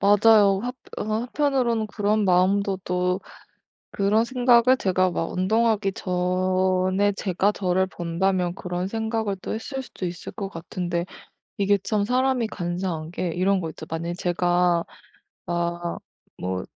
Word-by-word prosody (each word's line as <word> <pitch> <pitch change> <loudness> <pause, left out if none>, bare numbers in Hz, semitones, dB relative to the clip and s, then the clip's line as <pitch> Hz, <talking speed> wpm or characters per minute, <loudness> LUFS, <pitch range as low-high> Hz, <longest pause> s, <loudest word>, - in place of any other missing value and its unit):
맞아요. 205 -1 +5
합 250 +1 -3 0.2
어느 215 - -3
한편으로는 245 -1 0
그런 210 0 0
마음도 190 +2 +3
또 180 +1 0 0.7
그런 205 +3 +2
생각을 250 0 +4
제가 185 -4 +1
막 165 -1 -2
운동하기 210 +1 +1
전의 185 +1 +1
제가 195 +1 +1
저를 190 -1 0
본다면 180 +1 -1
그런 180 0 -3
생각을 220 -1 -2
또 - - -4
했을 265 +5 -4
수도 225 -7 -7
있을 175 -1 -6
것 200 -4 -4
같은데 175 0 -3 0.5
이게 200 0 +3
참 205 0 0
사람이 255 0 +1
간사한 175 -4 -3
게 175 0 -2
이런 185 +4 +1
거 165 - -3
있죠. - - -9
만약에 170 +1 -3
제가 175 -1 +1 0.6
막 170 0 -2 0.4
뭐 95 0 -3
190 Hz, 270 characters per minute, -24 LUFS, 180-215 Hz, 0.7 s, 맞아요